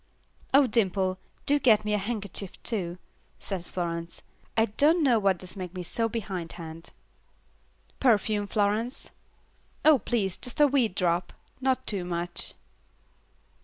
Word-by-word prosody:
"Oh 275 +1 +7
Dimple, 190 -5 +1 0.3
do 290 +1 +3
get 215 -5 +4
me 210 - 0
a 210 - +2
handkerchief 200 -3 -4
too," 180 -6 -2 0.4
said 190 -4 -4
Florence, 170 -2 -4 0.3
"I 225 - +5
don't 300 - +3
know 245 -5 +4
what 195 -3 +2
does 185 +2 -7
make 185 -2 -6
me 180 - -4
so 225 +6 -1
behindhand." 170 -6 -6 1.1
"Perfume, 210 -4 +2
Florence?" 215 +5 -1 0.7
"Oh, 305 -3 +7
please, 205 -8 -1
just 245 +2 -2
a 295 - +8
wee 270 -4 +3
drop, 180 -3 0 0.3
not 260 -1 +1
too 200 -4 -2
much." 175 0 -3
205 Hz, 130 wpm, -28 LUFS, 180-235 Hz, 1.1 s, a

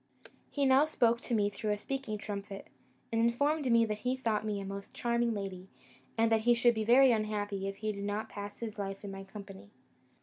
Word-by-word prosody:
He 285 -1 0
now 265 +2 +6
spoke 235 -6 +2
to 240 - -1
me 205 -1 +2
through 215 +1 -4
a 210 - +1
speaking 265 -1 -4
trumpet, 200 -1 -6 0.4
and 225 0 +1
informed 280 +4 +2
me 230 0 +5
he 225 +4 -1
thought 225 -5 0
me 210 -2 -2
a 195 - -5
most 195 0 -7
charming 235 -1 +1
lady, 195 -3 -5 0.5
and 225 0 +3
that 220 -1 +4
he 240 +2 +4
should 240 0 +4
be 220 -1 -1
very 255 +4 +6
unhappy 205 -3 -1
if 195 - -4
he 215 +1 -2
did 200 -1 -6
not 205 +2 -2
pass 205 -1 -7
his 220 -2 -6
life 195 0 -4
in 200 - -6
my 195 0 -7
company. 195 - -11
215 Hz, 210 wpm, -32 LUFS, 200-235 Hz, 0.5 s, now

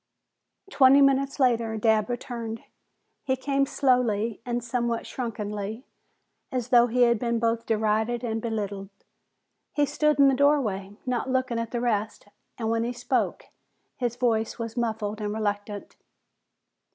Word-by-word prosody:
Twenty 275 0 +6
minutes 275 0 +3
later, 230 -4 +2
Dabb 215 0 +2
returned. 235 -2 -5 0.6
He 260 -2 +1
came 275 +1 0
slowly, 235 -6 +1
and 240 -1 -1
somewhat 235 -1 -1
shrunkenly, 215 -1 -5 0.7
as 250 -3 -2
though 240 -1 +6
he 245 +1 +3
had 235 -2 +3
been 235 0 0
both 230 0 0
derided 220 +2 0
and 225 -2 -2
belittled. 205 -4 -4 0.8
He 290 - +2
stood 300 +1 +1
in 280 -1 +6
the 270 - +4
doorway, 225 -9 +1
not 250 0 -1
looking 255 -2 0
at 230 -1 -3
the 240 0 -3
rest, 215 -3 -1 0.3
and 225 -1 -1
when 230 0 +1
he 240 +1 -2
spoke 245 +1 -2 0.5
his 240 -2 -2
voice 225 -3 0
was 230 -1 -5
muffled 220 -3 -2
and 210 0 -2
reluctant. 205 -1 -3
235 Hz, 140 wpm, -26 LUFS, 220-255 Hz, 0.8 s, Twenty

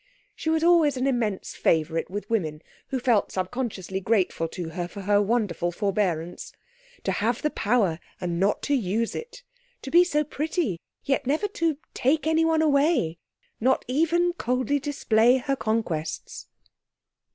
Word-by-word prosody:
She 320 - -4
was 320 0 +2
always 330 -5 +4
an 255 - 0
immense 235 -7 -1
favourite 160 0 +1
with 205 +2 -5
women, 160 -9 -1 0.2
who 265 - -2
felt 235 -4 +2
subconsciously 190 -1 -3
grateful 190 -5 +1
to 170 0 -6
her 175 +2 -4
for 200 +3 -9
her 205 +1 +3
wonderful 205 -6 0
forbearance. 180 -3 -2 0.5
To - - 0
have 230 +3 -1
the 300 - +1
power 205 -7 +1 0.2
and 175 -1 -2
not 195 +2 +1
to 290 - 0
use 225 -2 0
it! 485 +1 -8 0.4
To 270 - -6
be 345 +1 +7
so 300 -4 +1
pretty, 300 - -2 0.2
yet 270 -2 0
never 310 +9 +1
to 330 -6 0 0.2
take 300 +5 +1
anyone 320 0 +3
away! 280 - +2 0.4
not 260 +3 +2
even 330 +6 +2
coldly 255 -2 0
display 250 -4 +3
her 275 +2 -1
conquests. 190 - -3
235 Hz, 150 wpm, -25 LUFS, 190-295 Hz, 0.5 s, be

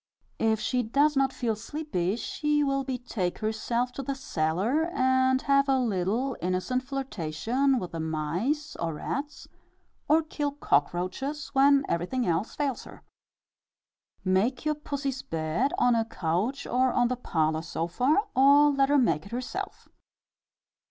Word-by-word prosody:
If 220 -1 +2
she 250 +2 0
does 285 +6 +2
not 270 0 +2
feel 230 -3 -1
sleepy, 215 - -2
she 295 +5 0
will 275 -1 0
betake 245 -8 -3
herself 235 +3 -1
to 275 - -6
the 275 +1 -3
cellar, 210 - 0
and 260 -3 +2
have 275 0 +3
a 270 - +4
little 230 +3 0
innocent 185 +8 -1
flirtation 255 - -1
with 180 -7 -4
the 165 - -5
mice 165 - -2
or 165 -2 -2
rats, 285 - -5 0.6
or 320 +2 +4
kill 295 -2 -3
cock 145 - +2
roaches 270 +12 -4
when 275 0 +4
everything 210 +9 -1
else 175 +4 -1
fails 280 -4 -2
her. - - -13 1.2
Make 205 +10 +1
your 305 - +2
pussy's 280 -3 -4
bed 165 - -1
on 245 - +4
a 230 -1 +2
couch 205 +6 -2
or 255 +1 +2
on 245 0 +2
the 255 - -1
parlour 160 -9 0
sofa, 175 - 0
or 285 +3 +6
let 275 -1 +2
her 290 - +4
make 170 - +1
it - - -15
herself. 250 +2 -5
250 Hz, 145 wpm, -27 LUFS, 185-275 Hz, 1.2 s, or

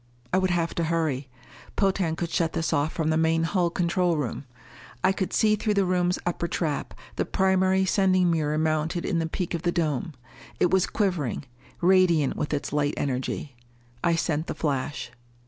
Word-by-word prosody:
I 185 - +4
would 185 0 +1
have 170 -1 0
to 170 - -1
hurry. 155 -5 -1 0.5
Potan 190 -5 +1
could 170 0 -4
shut 165 -2 0
this 165 - -1
off 145 +2 +1
from 160 -1 -1
the 160 - +2
main 165 0 +2
hull 175 +1 +1
control 175 0 +1
room. 135 -2 -3 0.6
I 190 - +5
could 190 -1 -2
see, 215 -1 +3
through 210 0 -1
the 200 -1 +3
room's 180 0 +1
upper 170 0 -1
trap, 160 -4 -2 0.2
the - - +2
primary 190 0 +2
sending 185 -2 +3
mirror 155 -2 0
mounted 155 +2 0
in 175 -4 0
the 165 0 -2
peak 180 +1 -3
of 170 - -2
the 175 0 +1
dome. 155 -3 -1 0.5
It 175 - +3
was 190 -1 +3
quivering, 175 - -1 0.4
radiant 175 -5 +4
with 150 - -3
its 145 -1 -2
light 145 0 +1
energy. 135 0 -3 0.5
I 170 -1 +3
sent 160 -1 -1
the - - -4
flash. 135 -3 -2
170 Hz, 180 wpm, -26 LUFS, 150-185 Hz, 0.6 s, I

